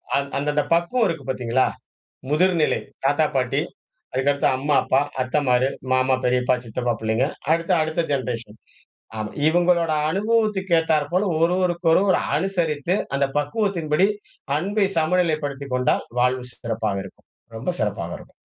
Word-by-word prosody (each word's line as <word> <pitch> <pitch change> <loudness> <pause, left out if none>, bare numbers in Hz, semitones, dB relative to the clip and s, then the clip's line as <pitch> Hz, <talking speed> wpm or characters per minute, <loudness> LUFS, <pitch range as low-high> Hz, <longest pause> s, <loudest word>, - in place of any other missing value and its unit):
அந் 140 0 0
அந்த 145 +1 -1
அந்த 150 0 +2
பக்குவம் 175 +8 +2
இருக்கு 160 -6 -4
பாத்தீங்களா? 130 0 +1 0.7
முதிர்நிலை. 165 0 +2 0.2
தாத்தா, 145 +3 +3
பாட்டி, 125 -2 +1 0.5
அதுக்கடுத்து 140 +2 +1
அம்மா, 145 +2 0
அப்பா, 135 - +3 0.2
அத்தைமாரு, 130 -1 +2 0.2
மாமா, 130 0 +3
பெரியப்பா, 125 0 +2
சித்தப்பா 120 +1 -2
புள்ளைங்க. 110 +4 +1 0.3
அடுத்து, 165 +3 +1
அடுத்த 160 +2 -1
ஜெனரேஷன். 120 -5 -3 0.6
ஆமா, 110 0 -3 0.2
இவங்களோட 175 -1 +2 0.2
அனுபவத்துக்கு 210 -2 +1
ஏத்தாற்போல, 165 +4 +1 0.2
ஒருவருக்கொருவர் 180 +1 +2
ஒரு - - +2 0.2
அனுசரித்து, 170 -2 0 0.2
அந்த 140 0 +2
பக்குவத்தின்படி 180 -2 +1 0.5
அன்பை 200 +4 +1
சமநிலைப்படுத்திக் 155 -5 0
கொண்டால் 125 0 +1 0.2
வாழ்வு 125 0 +1
சிறப்பாக 110 -4 -3
இருக்கும். 95 - -15 0.3
ரொம்ப 120 +9 -3
சிறப்பாக 90 -5 -2
இருக்கும். - - -16
150 Hz, 125 wpm, -23 LUFS, 130-175 Hz, 0.7 s, தாத்தா